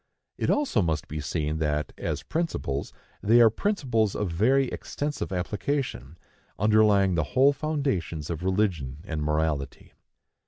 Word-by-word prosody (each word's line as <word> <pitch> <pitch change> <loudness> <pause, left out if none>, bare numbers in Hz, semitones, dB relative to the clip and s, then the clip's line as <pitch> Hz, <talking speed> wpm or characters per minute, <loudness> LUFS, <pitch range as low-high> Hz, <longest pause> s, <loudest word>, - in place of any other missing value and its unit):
It - - -1
also 285 - +2
must 80 -4 -1
be 75 - -5
seen 75 +1 -2
that, 75 -2 -1
as - - -3
principles, 155 - -2 0.3
they 115 +4 +5
are 115 -2 +7
principles 120 - 0
of 105 -4 -2
very 130 +10 +3
extensive 145 -7 -4
application, 95 - -3 0.4
underlying 105 -2 +4
the 80 -2 +1
whole 140 +2 +6
foundations 135 - -2
of 80 - -4
religion 90 -8 0
and 80 -5 -4
morality. 75 -2 -2
95 Hz, 130 wpm, -26 LUFS, 75-125 Hz, 0.4 s, are